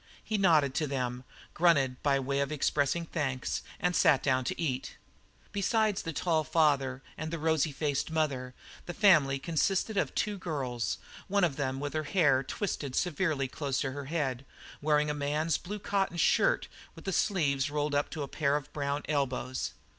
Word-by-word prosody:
He 220 - -2
nodded 160 -9 +4
to 155 +2 0
them, 125 -2 -3 0.3
grunted 140 -7 +3
by 140 -2 +2
way 140 +1 -1
of 140 +1 0
expressing 150 +2 +1
thanks, 135 -6 -2 0.2
and 180 0 +1
sat 135 -3 +4
down 130 -2 +2
to - - -3
eat. 135 -6 -2 0.5
Beside 210 +1 +1
the 165 - -3
tall 160 0 +1
father 140 -5 +1 0.2
and 155 +1 -3
the 170 - -3
rosy 160 -1 +1
faced 145 0 -1
mother, 135 -6 -1 0.3
the 175 - -5
family 155 -10 +5
consisted 190 +8 0
of - - +2
the - - -19
two 205 -2 -1
girls, 130 -9 -2 0.3
one 200 0 +2
of 165 -6 +2
them 135 -2 -2
with 145 0 -4
her 155 -1 -1
hair 145 -7 +3
twisted 140 -2 -3
severely 160 -5 0
close 135 0 -2
to 135 - -1
her 140 +1 -6
head, 135 -4 -2 0.4
wearing 150 0 +2
a - - -1
man's 150 +2 0
blue 205 +4 -6
cotton 195 -3 -1
shirt - - +3 0.3
with - - -13
the 195 - -1
sleeves 145 -10 +1
rolled 150 0 -1
up 145 0 +1
to 155 -4 -4
a - - -5
pair 140 0 0
of 150 -2 -4
brown 145 0 -2
elbows. 130 -3 -1
150 Hz, 180 wpm, -30 LUFS, 135-170 Hz, 0.5 s, family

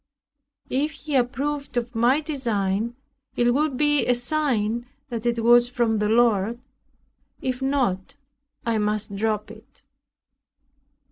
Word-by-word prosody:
If 295 +4 0
he 300 0 -7
approved 275 +2 -1
of 240 0 -2
my 245 +6 +3
design, 230 -7 -1 0.4
it 240 0 +3
would 290 -1 +1
be 295 0 +2
a 250 - +4
sign 240 -4 -1 0.2
that 235 -1 -3
it 235 -1 0
was 240 +1 +6
from 235 -3 +1
the 210 0 +1
Lord; 225 -1 +3 0.8
if 255 0 -3
not, 255 -9 0 0.5
I 230 -2 +1
must 210 -1 -1
drop 215 0 -1
it. 220 +1 -17
240 Hz, 125 wpm, -24 LUFS, 220-265 Hz, 0.8 s, was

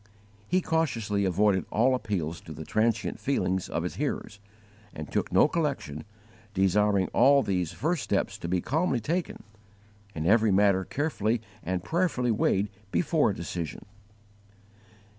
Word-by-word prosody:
He 185 +1 +2
cautiously 115 - 0
avoided 95 +1 +2
all 120 +5 +3
appeals 85 -10 -2
to 80 - -9
the 80 +1 -8
transient 110 +3 0
feelings 95 -9 -1
of - - -2
his - - -4
hearers, 100 - -3 0.6
and 75 -1 -7
took - - -1
no - - +5
collection, 140 - -2 0.5
desiring 95 +1 +3
all 140 +3 +5
these 90 -6 -1
first 160 0 -1
steps 100 -2 -1
to - - -5
be 90 +1 0
calmly 150 -1 0
taken, 165 - -3 0.7
and 80 0 -3
every 110 +4 +4
matter 100 -1 +3
carefully 120 -6 -1 0.2
and 90 0 -3
prayerfully 160 - 0
weighed 105 -1 +1 0.2
before 155 - +2
a 100 - -2
decision. 85 -1 -5
105 Hz, 140 wpm, -28 LUFS, 95-135 Hz, 0.7 s, no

